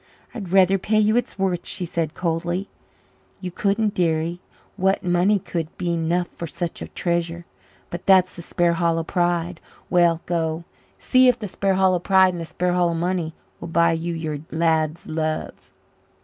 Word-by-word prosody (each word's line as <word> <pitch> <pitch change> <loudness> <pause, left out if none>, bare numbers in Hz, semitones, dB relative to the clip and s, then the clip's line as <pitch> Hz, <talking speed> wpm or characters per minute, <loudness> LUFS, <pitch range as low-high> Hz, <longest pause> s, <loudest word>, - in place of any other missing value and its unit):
"I'd 195 -6 -6
rather 190 0 +5
pay 215 +3 0
you 215 +1 +3
its 245 - -1
worth," 185 -3 0
she 185 - -2
said 165 -2 -3
coldly. 175 +2 -2 0.7
"You 180 -2 -5
couldn't, 205 +3 0
dearie. 170 -1 0 0.3
What 190 +1 +1
money 180 +3 +3
could 170 -4 -4
be 175 -2 -1
eno' 170 +2 +1
for 170 -1 -8
such 170 +1 -5
a - - -5
treasure? 170 -1 -2 0.5
But 175 - -7
that's 185 -1 +5
the 170 - -7
Sparhallow 170 -1 +1
pride. 175 -1 -1 0.3
Well, 170 -2 +3
go, 165 -1 -1 0.3
see 255 0 +4
if 250 -1 +4
the 210 - -5
Sparhallow 190 -1 +2
pride 190 0 +4
and 175 - -5
the - - -4
Sparhallow 175 0 0
money 170 -1 -2 0.2
will 170 - -7
buy 170 0 +3
you 165 +1 -2
your 155 -2 -3
lad's 160 0 0
love." 155 0 -3
175 Hz, 160 wpm, -23 LUFS, 165-185 Hz, 0.7 s, rather